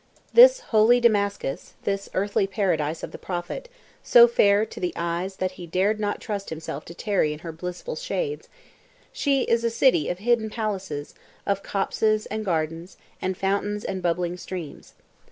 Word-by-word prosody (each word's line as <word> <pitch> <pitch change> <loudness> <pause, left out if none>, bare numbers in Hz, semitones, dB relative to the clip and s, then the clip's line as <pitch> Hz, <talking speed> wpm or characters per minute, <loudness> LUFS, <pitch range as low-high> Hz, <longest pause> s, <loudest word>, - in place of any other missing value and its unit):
This - - +8
"holy" 230 - +4
Damascus, 200 - 0
this 195 0 -2
"earthly 200 0 +1
paradise" 165 -6 -1
of - - -5
the - - -9
Prophet, 180 - -5 0.3
so 480 -1 +7
fair 210 - +4
to - - -10
the 180 - -2
eyes 170 +3 -2
that 185 -1 -2
he 175 - -7
dared 195 +6 +1
not 205 -1 -1
trust 205 -3 -5
himself 155 -2 -6
to 170 - -10
tarry 190 -7 0
in 150 - -9
her 165 - -4
blissful 180 - -6
shades, - - -3 0.6
she 280 - +1
is 230 0 +1
a 230 - +2
city 230 - +3
of 175 - -2
hidden 220 +2 +1
palaces, 195 -10 -4 0.3
of 200 -1 0
copses 215 +2 0
and 215 0 -2
gardens, 165 -1 -2 0.2
and 185 -1 -2
fountains 205 +2 -1
and 190 -1 -3
bubbling 175 0 -1
streams. 175 -4 -8
200 Hz, 165 wpm, -25 LUFS, 175-220 Hz, 0.6 s, This